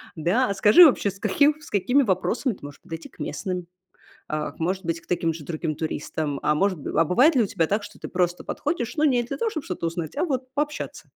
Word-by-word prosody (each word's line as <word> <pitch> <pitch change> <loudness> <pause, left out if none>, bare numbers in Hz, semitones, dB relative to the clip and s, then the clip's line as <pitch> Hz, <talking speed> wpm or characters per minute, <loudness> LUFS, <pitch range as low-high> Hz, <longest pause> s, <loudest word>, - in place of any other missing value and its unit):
да? 180 +11 +1
А - - +1
скажи 210 - +8
вообще, 245 -8 +3
с 195 - -9
каким 290 +8 +3
с 295 - -14
какими 245 +8 +3
вопросами 220 +5 0
ты - - -16
можешь 145 0 -10
подойти 165 0 -8
к - - -24
местным, 180 +3 -4 0.6
а, 155 0 -3
к - - -22
может 185 +3 -1
быть, 165 0 -2
к - - -24
таким 165 -2 0
же 155 - -9
другим 155 -2 -3
туристам, 150 -2 -3
а 150 - +2
мож 195 +4 +2
Б 150 -2 -3
а 165 - +5
бывает 265 - +4
ли 240 - +4
у - - -1
тебя 165 -4 0
так, 205 +1 0
что - - -11
ты - - -6
просто 180 -1 -1
подходишь, 285 -5 -3
ну, 305 - 0
не 255 -5 +4
для 240 - -5
того, 455 -2 -1
чтоб 310 - -4
что-то 180 -2 -4
узнать, 165 - -4
а - - +1
вот 260 -5 -2
пообщаться? 295 +1 -3
190 Hz, 245 wpm, -24 LUFS, 165-255 Hz, 0.6 s, скажи